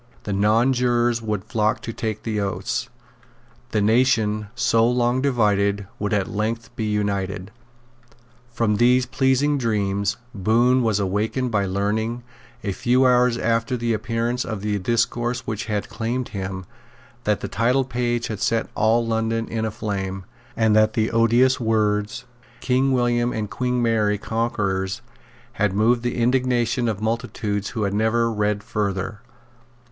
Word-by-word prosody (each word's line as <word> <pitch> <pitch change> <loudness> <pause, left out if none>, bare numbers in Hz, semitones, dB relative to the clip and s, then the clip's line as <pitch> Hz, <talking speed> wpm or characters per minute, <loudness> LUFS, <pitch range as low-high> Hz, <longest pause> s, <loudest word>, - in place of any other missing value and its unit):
The 100 - -3
nonjurors 120 +3 +2
would 105 -4 -2
flock 110 -1 0
to 115 - -5
take 110 -2 -4
the 110 -2 -2
oaths. 100 -1 -2 0.8
The 105 - 0
nation, 110 -2 +2
so 115 -1 +3
long 125 +1 +1
divided, 100 -6 +1
would 105 +1 -2
at 100 -3 +1
length 115 +3 -3
be 110 - -2
united. 100 -2 -2 1.0
From 115 -3 +1
these 125 +2 +4
pleasing 135 +2 +1
dreams 100 -3 0 0.2
Bohun 120 +5 +3
was 110 -4 +1
awakened 105 +6 -1
by 100 -3 +1
learning, 110 +5 -1 0.4
a 100 - -1
few 125 +6 +2
hours 125 -1 +4
after 115 +2 0
the 115 -1 0
appearance 115 +3 -1
of 110 -4 -5
the 105 -1 -1
discourse 120 +3 0
which 115 -4 -4
had 105 -2 -2
charmed 120 +2 -3
him, 95 -2 -5 0.6
that - - +1
the - - -3
titlepage 120 -1 0
had 110 -3 -4
set 115 +2 0
all 115 +2 +2
London 115 0 -1
in 110 -1 -2
a - - -1
flame, 100 -4 -4 0.3
and 110 -2 +3
that 110 0 +4
the 110 -3 0
odious 120 +3 +3
words, 110 0 0 0.3
King 130 +2 +1
William 120 -1 +1
and 110 -3 -4
Queen 125 -1 -1
Mary 110 -3 +2
Conquerors, 105 -2 -2 0.6
had 105 -2 +2
moved 115 +3 +3
the 120 0 -2
indignation 120 -1 +1
of 105 -2 -3
multitudes 110 -3 -2
who 110 - -3
had 100 -1 -1
never 115 +2 +1
read 105 -1 -1
further. 100 -2 -2
115 Hz, 145 wpm, -22 LUFS, 105-120 Hz, 1.0 s, these